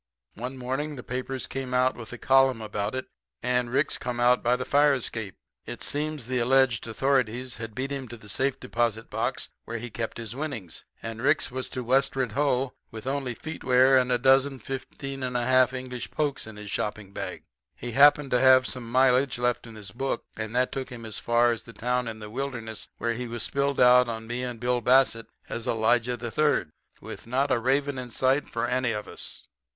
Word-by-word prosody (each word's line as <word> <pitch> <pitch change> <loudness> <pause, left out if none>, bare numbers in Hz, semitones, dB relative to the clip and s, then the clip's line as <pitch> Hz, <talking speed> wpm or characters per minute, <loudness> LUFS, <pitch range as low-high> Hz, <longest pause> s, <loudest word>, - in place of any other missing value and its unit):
One 125 +4 -6
morning 135 +4 -3
the 125 - -8
papers 130 +1 -4
came 130 -1 -4
out 130 +1 +3
with 115 -2 -9
a 125 - -6
column 135 -1 +4
about 105 +1 -3
it, 130 - -3 0.4
and 125 0 +1
Ricks 135 +5 +1
come 120 -1 -3
out 125 +1 +4
by 120 +1 +3
the - - -3
fire 145 0 +4
escape. 110 -5 -4 0.3
It - - -6
seems 150 -3 -1
the 130 +1 -1
alleged 125 -2 +3
authorities 125 0 0
had 115 -2 -7
beat 135 +3 -3
him 135 -2 -4
to 120 - -9
the 105 - -14
safe 135 +6 0
deposit 115 -3 -1
box - - -1 0.2
where 115 - -4
he 120 +1 -7
kept 115 0 -4
his 115 -1 -6
winnings, 135 - -5 0.2
and 115 0 -5
Ricks 155 +6 +3
has 130 +1 -4
to 130 - -4
westward 130 -1 +1
ho! 135 0 +1 0.2
with 110 +1 -9
only 135 -2 -2
feetwear 130 -3 +3
and 125 -1 +3
a 125 - +4
dozen 135 +2 +4
15 135 +2 -6
and 125 -1 -1
a 120 - 0
half 130 0 +5
English 130 -1 -5
pokes 145 -6 -2
in 110 - -9
his 105 -1 -8
shopping 105 -1 -3
bag. - - -5 0.3
He 120 - -6
happened 145 +2 +6
to 125 - +4
have 130 0 +6
some 120 -2 -5
mileage 130 +1 +4
left 120 0 0
in 115 - -11
his 105 -3 -9
book, 135 +3 -2
and 110 +1 -5
that 125 0 +2
took 135 -1 -4
him 120 -3 -8
as 110 -2 -5
far 120 0 +3
as 115 - -3
the 115 - -13
town 125 +1 -1
in 110 -1 -5
the 105 -1 -9
wilderness 120 -4 -4
where 115 0 0
he 125 +1 -4
was 115 -1 -4
spilled 140 0 0
out 125 0 +6
on 110 -1 -4
me 120 +2 -3
and 125 -2 -4
Bill 125 +1 0
Bassett 125 -2 +4 0.2
as 115 - -5
Elijah 115 +2 +2
III. 120 - +1 0.3
with - - -9
not 135 +4 +1
a 120 - +3
raven 135 +2 +1
in 125 -1 -6
sight 130 +4 +1
for 115 - -2
any 125 -2 0
of 105 0 -5
us. - - -6
125 Hz, 210 wpm, -27 LUFS, 115-135 Hz, 0.4 s, happened